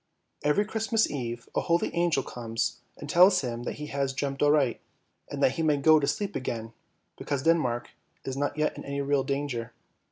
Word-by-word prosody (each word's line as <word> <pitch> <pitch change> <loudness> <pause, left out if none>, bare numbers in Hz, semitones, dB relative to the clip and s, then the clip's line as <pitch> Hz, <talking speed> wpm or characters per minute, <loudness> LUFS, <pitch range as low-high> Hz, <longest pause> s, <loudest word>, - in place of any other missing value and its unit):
Every 150 +8 +2
Christmas 220 +1 +1
Eve 120 -4 -4
a - - +2
holy 170 0 +1
angel 170 -5 +1
comes 115 -1 -3 0.2
and - - -8
tells 185 +2 +6
him 120 -3 -4
that - - -2
he 150 - -6
has 140 -1 0
dreamt 135 0 -3
aright, 145 -4 +3 0.5
and - - -3
that - - +5
he 150 - -3
may 150 -2 +3
go 155 +2 +6
to 140 - -1
sleep 205 -1 -2
again, 115 -3 -4 0.5
because 140 -2 -2
Denmark 140 -8 +1 0.3
is 135 - -3
not 145 +1 -2
yet 155 0 0
in - - -8
any 140 0 -3
real 140 -1 +1
danger. 135 -5 -3
140 Hz, 190 wpm, -28 LUFS, 125-160 Hz, 0.5 s, tells